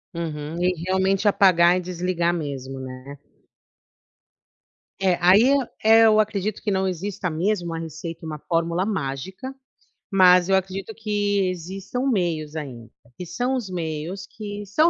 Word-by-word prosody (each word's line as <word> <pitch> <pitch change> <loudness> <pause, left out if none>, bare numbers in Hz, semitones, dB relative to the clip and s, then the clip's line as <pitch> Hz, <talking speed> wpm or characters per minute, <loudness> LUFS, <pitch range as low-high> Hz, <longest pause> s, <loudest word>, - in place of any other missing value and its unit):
Uhum, 160 0 -4
e 180 0 +2
realmente 190 +2 +1
apagar 180 -3 +5
e 185 - -1
desligar 175 -1 -1
mesmo, 135 -5 -5
né. 130 +2 -9 1.8
É, 185 -2 +2
aí 195 +8 +6
eu 280 - +5 0.3
eu 220 0 +6
acredito 215 -1 -1
que 210 - -1
não 190 0 +1
exista 185 +1 -3
mesmo 175 +3 -1
uma 165 -1 -4
receita, 165 +1 -7
uma 155 -1 -5
fórmula 170 +2 0
mágica, 190 - -4 0.6
mas 180 -1 +6
eu 195 - +4
acredito 190 +2 -3
que 205 -3 0
existam 190 +8 -5
meios 165 - -1
ainda, 125 -7 -7 0.3
que 180 - -6
são 250 +9 -1
os 240 -7 -4
meios 170 +2 -4
que 205 -1 -7
são 305 - +3
185 Hz, 140 wpm, -23 LUFS, 165-205 Hz, 1.8 s, aí